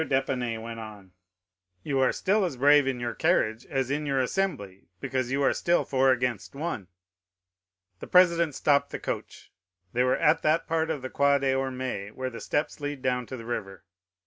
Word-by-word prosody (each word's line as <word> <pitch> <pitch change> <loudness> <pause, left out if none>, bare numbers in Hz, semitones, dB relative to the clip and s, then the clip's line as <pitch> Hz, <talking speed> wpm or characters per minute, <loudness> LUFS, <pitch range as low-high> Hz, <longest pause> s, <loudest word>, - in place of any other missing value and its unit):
d'Épinay 130 -5 -1
went 115 +1 -7
on,—"You 90 +2 -9
are 130 -1 +4
still 205 +2 +1
as 170 -8 -2
brave 145 +1 +5
in 130 -2 -1
your 120 -1 -3
carriage 120 -9 +1
as 135 -1 -1
in 150 +1 -1
your 135 -1 +1
assembly 125 - -2
because 130 +1 -2
you 140 +1 +1
are - - +3
still 175 0 +1
four 135 -1 +3
against 120 -7 -2
one." 140 - -4 1.1
The - - -8
president 170 -4 +4
stopped 140 -1 +2
the - - -5
coach. - - -6 0.4
They 125 - +1
were 125 - +2
at 155 +2 +3
that 155 +2 +2
part 160 -1 0
of 150 -5 -3
the 130 - -5
Quai 140 0 +3
des 135 -1 +1
Ormes 130 -6 -3
where 130 0 -4
the 115 - -8
steps 145 +2 -2
lead 145 -2 -4
down 125 -2 0
to 130 - -6
the 115 - -9
river. 95 -5 -5
130 Hz, 185 wpm, -27 LUFS, 115-145 Hz, 1.1 s, brave